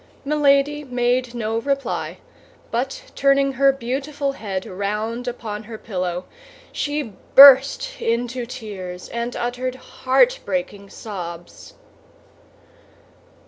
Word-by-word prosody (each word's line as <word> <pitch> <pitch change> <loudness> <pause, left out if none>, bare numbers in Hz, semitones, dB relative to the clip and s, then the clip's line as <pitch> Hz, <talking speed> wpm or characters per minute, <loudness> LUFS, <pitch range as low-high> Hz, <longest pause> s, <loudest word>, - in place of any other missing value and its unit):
Milady 295 0 +2
made 245 -1 0
no 225 -1 -1
reply, 275 +2 -2 0.5
but - - -2
turning 275 0 +3
her 275 +1 +4
beautiful 275 +3 -3
head 195 -8 -5
round 210 +5 -3
upon 220 -3 -5
her 220 0 -8
pillow, 180 -4 -4 0.5
she 290 -7 -3 0.2
burst 280 - +8
into 240 +1 -1
tears, 200 -8 -7
and 235 +1 -4
uttered 250 +1 -3
heartbreaking 270 - 0
sobs. 175 -6 -8
245 Hz, 95 wpm, -21 LUFS, 215-275 Hz, 0.5 s, burst